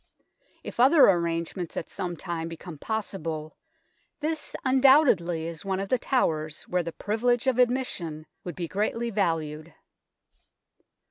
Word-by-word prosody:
If - - -8
other 275 +5 +7
arrangements 170 0 -2
at - - -3
some 175 -2 -5
time 165 -1 -4
become 165 -1 -9
possible, 165 -8 -4 0.6
this 315 +1 -3
undoubtedly 260 - +4
is 165 +1 -6
one 190 -1 -1
of 195 0 -4
the 255 - +2
towers 155 - 0
where 180 0 0
the 170 0 -5
privilege 240 +6 0
of 260 -2 +2
admission 235 -12 0 0.2
would 175 -4 -6
be 175 -2 -3
greatly 225 +5 -1
valued. 165 -5 -1
180 Hz, 130 wpm, -27 LUFS, 165-240 Hz, 0.6 s, other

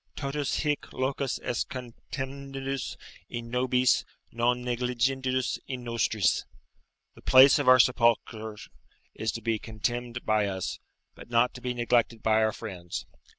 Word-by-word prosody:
"Totus 140 0 -2
hic 150 -1 -1
locus 130 0 -1
est 125 - -2
contemnendus 135 +1 -5 0.3
in 115 0 -6
nobis, 125 0 +3 0.3
non 120 +1 +1
negligendus 125 +1 0
in 130 -2 -5
nostris;" 110 -5 +1 0.7
["The - - -16
place 130 +2 +7
of 145 - -1
our 130 0 +9
sepulture 115 -3 +2 0.6
is 110 -1 -2
to 115 - -6
be 115 -2 0
contemned 120 +2 -3
by 110 -1 +2
us, 95 -2 -3 0.3
but - - -13
not 120 +1 +3
to 125 - -10
be 125 0 -2
neglected 120 -1 +1
by 110 0 +4
our 110 0 +3
friends." 90 -6 -6
120 Hz, 135 wpm, -28 LUFS, 115-130 Hz, 0.7 s, our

